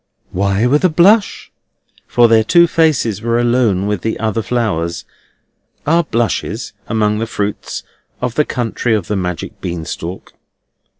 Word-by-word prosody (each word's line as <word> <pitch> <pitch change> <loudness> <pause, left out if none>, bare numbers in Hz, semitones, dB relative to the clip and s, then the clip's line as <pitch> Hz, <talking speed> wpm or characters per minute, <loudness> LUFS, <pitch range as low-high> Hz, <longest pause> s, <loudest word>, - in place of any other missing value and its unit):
Why 100 +3 +1
with 145 +6 +2
a 185 - +5
blush? 200 +7 +3 0.6
For 120 -1 +4
their 115 -1 +4
two 170 +9 +5
faces 150 - +1
were 115 0 0
alone 120 -5 +2
with 105 -3 -1
the 110 +3 -2
other 110 0 -1
flowers. 100 -9 -2 0.8
Are 165 +3 +3
blushes 115 -4 -2
among 105 -1 +1
the 115 - -2
fruits 105 -2 -4 0.4
of 125 -2 -2
the 150 - +2
country 120 -3 -1
of 105 -5 -2
the 105 - -2
magic 90 -3 -4
bean 85 -2 -4
stalk? 85 +2 -7
115 Hz, 145 wpm, -16 LUFS, 100-125 Hz, 0.8 s, a